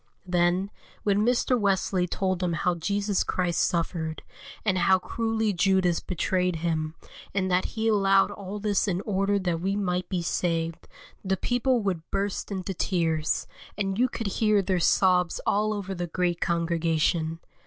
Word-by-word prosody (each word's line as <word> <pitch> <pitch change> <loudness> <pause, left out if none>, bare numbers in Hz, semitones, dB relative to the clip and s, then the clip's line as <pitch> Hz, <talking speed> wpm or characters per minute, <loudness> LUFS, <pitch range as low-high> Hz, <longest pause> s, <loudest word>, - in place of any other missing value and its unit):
Then, 180 +2 +1 0.3
when 205 0 +2
Mr. 245 +1 +2
Wesley 190 -2 +1
told 185 0 -1
them 180 -2 0
how 175 +3 +1
Jesus 200 +4 0
Christ 175 -2 0
suffered, 165 -2 -1 0.4
and 190 -3 +2
how 190 +2 +5
cruelly 225 +2 -1
Judas 185 -1 +2
betrayed 180 0 -1
Him, 160 -1 -2 0.4
and 190 -1 0
that 180 +1 +2
He 220 0 +1
allowed 195 -2 +4
all 200 +1 -6
this 205 0 0
in 185 -1 0
order 200 -1 +1
that 175 -4 -1
we 195 +2 0
might 180 -3 -1
be 180 -3 -1
saved, 165 -1 -1 0.4
the 190 -1 0
people 245 +2 +1
would 185 -5 -1
burst 200 0 -2
into 190 0 -3
tears, 165 -4 0 0.3
and 195 0 -1
you 250 +1 +3
could 230 - -5 0.2
hear 210 -2 +4
their 185 -1 0
sobs 180 0 +3
all 210 +1 +2
over 200 -2 -3
the 175 -1 -3
great 175 0 -1
congregation. 165 -1 0
185 Hz, 155 wpm, -26 LUFS, 175-200 Hz, 0.4 s, how